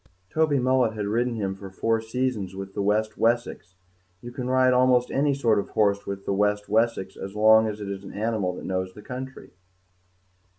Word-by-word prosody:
Toby 155 Hz, -2 st, +2 dB
Mullet 130 Hz, -2 st, +2 dB
had 105 Hz, -1 st, -3 dB
ridden 120 Hz, +3 st, 0 dB
him 100 Hz, -3 st, -2 dB
for 95 Hz, 0 st, -10 dB
four 115 Hz, +4 st, 0 dB
seasons 110 Hz, -5 st, -2 dB
with 95 Hz, 0 st, -7 dB
the -, -, -2 dB
West 105 Hz, +2 st, 0 dB
Wessex; 115 Hz, -5 st, 0 dB, 0.4 s
you 120 Hz, -, -9 dB
can 125 Hz, 0 st, -5 dB
ride 130 Hz, 0 st, +4 dB
almost 125 Hz, -1 st, +3 dB
any 140 Hz, 0 st, +1 dB
sort 115 Hz, -6 st, +2 dB
of -, -, -4 dB
horse 100 Hz, -1 st, +1 dB
with 100 Hz, 0 st, -5 dB
the -, -, 0 dB
West 105 Hz, +1 st, +1 dB
Wessex 110 Hz, -3 st, 0 dB
as 95 Hz, +1 st, -8 dB
long 110 Hz, +1 st, +6 dB
as 105 Hz, -1 st, -4 dB
it 105 Hz, -, -6 dB
is 100 Hz, 0 st, -5 dB
an 100 Hz, -, -9 dB
animal 105 Hz, -4 st, -1 dB
that -, -, -8 dB
knows 95 Hz, 0 st, -3 dB
the 105 Hz, -, -12 dB
country. 130 Hz, +2 st, -8 dB
110 Hz, 200 wpm, -25 LUFS, 100-125 Hz, 0.4 s, long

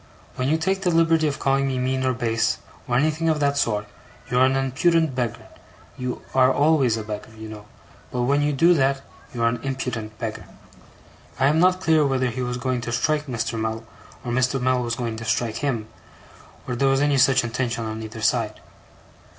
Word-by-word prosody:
When 130 Hz, -, -1 dB
you 160 Hz, -, +3 dB
take 190 Hz, +4 st, -1 dB
the 185 Hz, -, +1 dB
liberty 165 Hz, -1 st, +3 dB
of 140 Hz, -, -2 dB
calling 135 Hz, 0 st, +1 dB
me 130 Hz, -1 st, -1 dB
mean 130 Hz, +1 st, 0 dB
or 130 Hz, -, +2 dB
base, 115 Hz, -2 st, 0 dB, 0.3 s
or 120 Hz, -, 0 dB
anything 155 Hz, +4 st, +1 dB
of 155 Hz, -1 st, +1 dB
that 140 Hz, -1 st, +1 dB
sort, 105 Hz, -7 st, 0 dB, 0.5 s
you 125 Hz, -, +2 dB
are 130 Hz, -, +6 dB
an 130 Hz, -, +1 dB
impudent 155 Hz, +4 st, +2 dB
beggar. 125 Hz, -3 st, -3 dB, 0.5 s
You 125 Hz, -1 st, -5 dB
are 130 Hz, 0 st, +5 dB
always 140 Hz, -5 st, +3 dB
a 110 Hz, -, -4 dB
beggar, 105 Hz, 0 st, -6 dB
you 110 Hz, 0 st, -8 dB
know; 105 Hz, -1 st, -10 dB, 0.4 s
but 125 Hz, -1 st, -2 dB
when 140 Hz, +3 st, +2 dB
you 145 Hz, 0 st, +1 dB
do 165 Hz, +5 st, +4 dB
that, 135 Hz, -3 st, +1 dB, 0.3 s
you 120 Hz, -1 st, -3 dB
are -, -, +4 dB
an 115 Hz, 0 st, 0 dB
impudent 125 Hz, -5 st, -4 dB
beggar.' 115 Hz, -2 st, -5 dB, 0.9 s
I 135 Hz, -, +3 dB
am 150 Hz, +3 st, +3 dB
not 185 Hz, +1 st, +3 dB
clear 160 Hz, -3 st, +4 dB
whether 130 Hz, -3 st, +1 dB
he 130 Hz, +2 st, -4 dB
was 125 Hz, 0 st, -2 dB
going 125 Hz, -1 st, -1 dB
to 120 Hz, -, -4 dB
strike 150 Hz, +5 st, 0 dB
Mr. 115 Hz, -2 st, -2 dB
Mell, 110 Hz, +1 st, -2 dB, 0.4 s
or 120 Hz, -, -2 dB
Mr. 130 Hz, +2 st, +1 dB
Mell 130 Hz, 0 st, +1 dB
was 120 Hz, -1 st, -2 dB
going 115 Hz, -2 st, -3 dB
to 115 Hz, -, -6 dB
strike 115 Hz, -1 st, -1 dB
him, 120 Hz, -7 st, -2 dB, 0.8 s
or 125 Hz, -, -2 dB
there 135 Hz, +3 st, +2 dB
was 135 Hz, 0 st, +3 dB
any 145 Hz, -2 st, +3 dB
such 130 Hz, 0 st, +4 dB
intention 120 Hz, 0 st, -2 dB
on 110 Hz, 0 st, -5 dB
either 110 Hz, +1 st, -8 dB
side. -, -, 0 dB
130 Hz, 205 wpm, -23 LUFS, 115-145 Hz, 0.9 s, are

